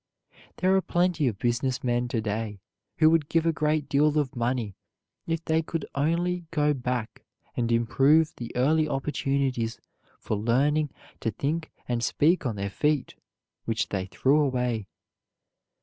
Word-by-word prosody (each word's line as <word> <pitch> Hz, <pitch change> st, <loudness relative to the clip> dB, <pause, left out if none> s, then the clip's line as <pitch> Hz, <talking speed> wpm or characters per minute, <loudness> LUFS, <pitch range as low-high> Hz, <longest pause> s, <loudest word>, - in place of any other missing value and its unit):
There 185 Hz, +1 st, +3 dB
are 190 Hz, -, +4 dB
plenty 175 Hz, -5 st, +1 dB
of 110 Hz, -5 st, -1 dB
business 125 Hz, +3 st, -1 dB
men 120 Hz, 0 st, +1 dB
to 120 Hz, -2 st, -1 dB
day 105 Hz, -1 st, -3 dB, 0.4 s
who 155 Hz, -1 st, +6 dB
would 160 Hz, -3 st, +2 dB
give 165 Hz, 0 st, +2 dB
a 165 Hz, -, +3 dB
great 155 Hz, -1 st, 0 dB
deal 150 Hz, +2 st, +3 dB
of 145 Hz, -4 st, 0 dB
money 120 Hz, -4 st, -1 dB, 0.5 s
if 165 Hz, 0 st, -2 dB
they 160 Hz, 0 st, +2 dB
could 165 Hz, -1 st, -4 dB
only 170 Hz, +4 st, 0 dB
go 150 Hz, -2 st, +2 dB
back 125 Hz, -4 st, -3 dB, 0.3 s
and 120 Hz, -1 st, 0 dB
improve 135 Hz, +7 st, +3 dB
the 120 Hz, -1 st, -6 dB
early 155 Hz, +5 st, +2 dB
opportunities 135 Hz, -4 st, -1 dB, 0.4 s
for 110 Hz, -, -2 dB
learning 140 Hz, +8 st, +2 dB, 0.3 s
to 115 Hz, -, -1 dB
think 155 Hz, +9 st, -2 dB, 0.2 s
and 120 Hz, -1 st, -1 dB
speak 155 Hz, +2 st, +2 dB
on 115 Hz, -, -2 dB
their 100 Hz, 0 st, -3 dB
feet 150 Hz, +4 st, 0 dB, 0.5 s
which 115 Hz, +1 st, -1 dB
they 95 Hz, -2 st, -2 dB
threw 135 Hz, +9 st, +2 dB
away. 125 Hz, -6 st, 0 dB
135 Hz, 150 wpm, -27 LUFS, 120-155 Hz, 0.5 s, who